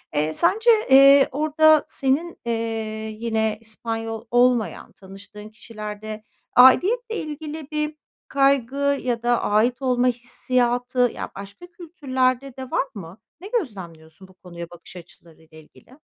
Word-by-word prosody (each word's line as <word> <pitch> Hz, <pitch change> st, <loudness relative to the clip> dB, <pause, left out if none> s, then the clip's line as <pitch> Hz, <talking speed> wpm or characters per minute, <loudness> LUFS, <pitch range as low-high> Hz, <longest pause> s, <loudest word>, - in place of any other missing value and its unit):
eee, 155 Hz, +1 st, 0 dB
sence, 435 Hz, -, +2 dB, 0.2 s
eee, 275 Hz, +1 st, +7 dB
orada 310 Hz, +2 st, +3 dB
senin, 285 Hz, +6 st, -1 dB
eee, 235 Hz, -, -1 dB, 0.7 s
yine 220 Hz, -2 st, -1 dB
İspanyol 225 Hz, 0 st, -5 dB
olmayan 245 Hz, -2 st, +1 dB
tanıştığın 200 Hz, +2 st, -13 dB
kişilerde 215 Hz, 0 st, -8 dB, 0.3 s
aidiyetle 435 Hz, -, +5 dB
ilgili 305 Hz, -2 st, -6 dB
bir 300 Hz, 0 st, -2 dB, 0.3 s
kaygı 275 Hz, +1 st, +1 dB
ya 240 Hz, -2 st, -2 dB
da 240 Hz, 0 st, +1 dB
ait 240 Hz, +5 st, +1 dB
olma 250 Hz, -1 st, +1 dB
hissiyatı, 245 Hz, 0 st, -1 dB
ya, -, -, -7 dB
başka 200 Hz, -, -11 dB
kültürlerde 270 Hz, -6 st, -2 dB
de 260 Hz, -1 st, -8 dB
var 275 Hz, -, 0 dB
mı? 185 Hz, -1 st, -10 dB, 0.2 s
Ne 385 Hz, -, -8 dB
gözlemliyorsun 190 Hz, -, -6 dB
bu 190 Hz, -, -20 dB
konuya 170 Hz, -2 st, -10 dB
bakış 175 Hz, +1 st, -14 dB
açılarıyla 165 Hz, -2 st, -16 dB
ilgili? 245 Hz, -, -19 dB
245 Hz, 125 wpm, -22 LUFS, 210-280 Hz, 0.7 s, eee